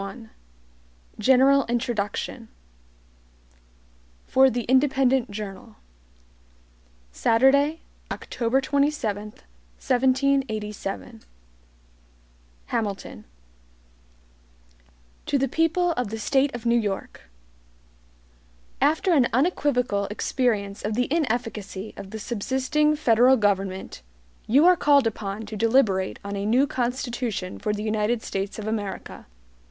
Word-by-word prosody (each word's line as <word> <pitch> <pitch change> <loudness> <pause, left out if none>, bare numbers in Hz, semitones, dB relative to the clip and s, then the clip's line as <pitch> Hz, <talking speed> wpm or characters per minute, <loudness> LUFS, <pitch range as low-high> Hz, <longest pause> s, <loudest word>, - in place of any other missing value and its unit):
1 220 +3 -9 0.9
General 265 +4 +5
Introduction 235 -1 -3 1.8
For 265 0 +5
the 240 -1 -2
Independent 265 -1 +2
Journal. 205 +1 -8 1.4
Saturday, 275 - +3 0.3
October 240 +3 -1
27, 280 -7 0
1787 220 - -2 1.4
HAMILTON 205 -3 -4 2.0
To 285 - +2
the 270 0 +1
People 330 +5 +1
of 250 -7 -2
the 225 - -5
State 270 +5 +1
of 240 -1 -8
New 235 0 +3
York: 200 - -5 1.5
AFTER 315 +6 +2
an 265 -6 +4
unequivocal 250 - +1
experience 210 -1 -1
of 210 +1 -2
the 250 +1 +1
inefficacy 225 - -3
of 195 - -9
the 220 - -6
subsisting 260 +7 0
federal 250 -2 +4
government, 195 - -1 0.5
you 275 +8 +5
are 360 0 +7
called 285 -5 +4
upon 210 -1 -3
to 215 - -7
deliberate 220 -4 +2
on 200 0 -4
a 200 +1 -3
new 250 +5 +4
Constitution 240 -6 -3
for 210 0 -1
the 210 0 -3
United 220 +1 0
States 195 +1 -4
of 215 - -6
America. 215 -3 -5
235 Hz, 100 wpm, -24 LUFS, 210-265 Hz, 2.0 s, are